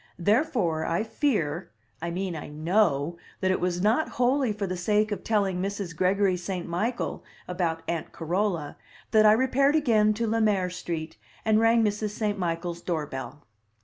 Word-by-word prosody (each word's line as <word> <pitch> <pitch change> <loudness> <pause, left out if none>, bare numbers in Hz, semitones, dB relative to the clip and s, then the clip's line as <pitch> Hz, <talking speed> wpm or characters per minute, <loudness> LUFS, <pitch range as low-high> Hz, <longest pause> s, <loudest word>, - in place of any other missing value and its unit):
Therefore 205 - +1
I 170 +5 0
fear 210 - -1 0.3
I 170 - -2
mean, 180 0 -3
I 155 - -6
know 160 -1 +1 0.2
that 185 -1 +1
it 185 - +1
was 180 0 -1
not 225 +9 +2
wholly 250 0 +2
for 205 -1 -3
the 185 -1 -3
sake 210 +4 +1
of 205 - -3
telling 195 -4 +1
Mrs. 195 -3 -4
Gregory 190 +2 +2
St. 180 0 -4
Michael 215 +9 -2 0.2
about 170 -3 -2
Aunt 170 -2 -3
Carola 175 -2 -2 0.3
that 215 -1 +6
I - - +8
repaired 265 +5 +3
again 215 -8 +3
to 230 +2 -1
Le 225 +1 +1
Maire 195 -4 +2
Street 165 -6 -5 0.3
and 220 0 +4
rang 230 0 +4
Mrs. 210 0 -1
St. 210 -2 -1
Michael's 170 -1 -2
door 160 -4 -2
bell. 145 +2 -7
195 Hz, 170 wpm, -27 LUFS, 170-215 Hz, 0.3 s, I